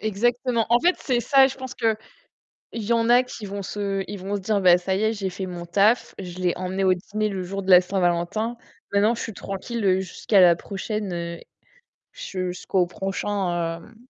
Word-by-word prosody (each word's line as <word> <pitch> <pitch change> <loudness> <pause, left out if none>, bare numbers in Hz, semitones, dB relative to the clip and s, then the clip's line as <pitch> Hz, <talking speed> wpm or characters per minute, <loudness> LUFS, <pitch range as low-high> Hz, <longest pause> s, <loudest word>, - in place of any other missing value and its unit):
Exactement. 235 +3 0
En 240 - +5
fait, 355 +2 +3
c'est 245 -3 0
ça. 270 +1 +5
Je 270 - -5
pense 260 -1 -7
que 225 -2 +1 0.8
il 230 - -4
y 215 - -3
en 230 0 +1
a 245 +1 +6
qui 235 -4 -9
vont 200 0 -5
se 195 -1 -2
ils 205 0 -6
vont 195 +2 -3
se 200 - -3
dire: 205 +1 +1
«Beh 180 -1 +7
ça 185 +2 -2
y 195 - -1
est, 220 +1 +2
j'ai 195 -3 -3
fait 190 +1 -5
mon 175 -1 -7
taf. 205 +7 +2
Je 180 -2 -7
l'ai 180 -2 +1
emmené 185 +1 -2
au 185 -1 +5
dîner 215 +4 -3
le 190 -2 -4
jour 195 +2 -5
de 190 - 0
la 180 0 +9
Saint-Valentin. 185 +5 -1 0.4
Maintenant, 210 +4 +3
je - - -6
suis 220 - -5
tranquille 195 0 -1
jusqu'à 190 +1 +2
la 175 -1 +7
prochaine 185 -3 -4 0.7
jusqu'au 185 - -2
prochain, 185 -3 -2
hem, 225 - -17
195 Hz, 200 wpm, -24 LUFS, 185-225 Hz, 0.8 s, la